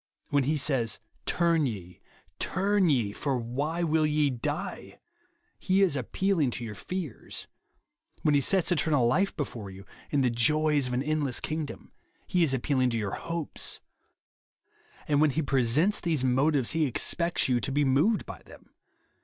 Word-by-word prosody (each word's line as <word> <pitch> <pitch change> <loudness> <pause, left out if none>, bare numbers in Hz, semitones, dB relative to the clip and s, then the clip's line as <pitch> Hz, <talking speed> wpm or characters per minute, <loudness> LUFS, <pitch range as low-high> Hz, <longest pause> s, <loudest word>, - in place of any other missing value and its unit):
When 140 -2 +2
he 155 +3 +1
says, 130 -6 0 0.2
" - - -39
Turn 165 -4 +3
ye, 90 -7 -7 0.4
turn 195 -1 +1
ye, 120 -8 +1
for 135 +5 -2
why 140 +9 -2
will 155 -1 +2
ye 150 -1 +2
die 145 +5 -4
f - - -24 0.3
* 345 +1 -44
he 195 0 +2
is 180 -7 +2
appeahng 155 - 0
to 120 - -5
your 110 - -6
fears. 165 - -6 0.8
When 150 - +3
he 145 - +4
sets 185 +6 +2
eternal 150 -6 +2
life 185 +12 +1
before 115 -8 -5
you, 95 +1 -11 0.3
and 140 -2 +2
the 125 - +2
joys 150 +3 +3
of 125 - -4
an 125 +2 0
endless 150 -3 0
kingdom, 155 -1 -5 0.3
he 180 -1 +2
is 155 - +2
appealing 130 0 +1
to 115 - -1
your 105 -3 -2
Itopes. 165 -2 -4 1.3
And 145 -1 +2
when 155 - +5
he 155 +4 -1
presents 135 - +2
these 160 -6 0
motives, 130 +1 +2
he 160 -2 +1
expects 170 +7 0
you 125 -2 +2
to 135 - -3
be 145 +1 +2
moved 145 +12 +2
by - - -9
them. - - -17
145 Hz, 170 wpm, -28 LUFS, 125-165 Hz, 1.3 s, when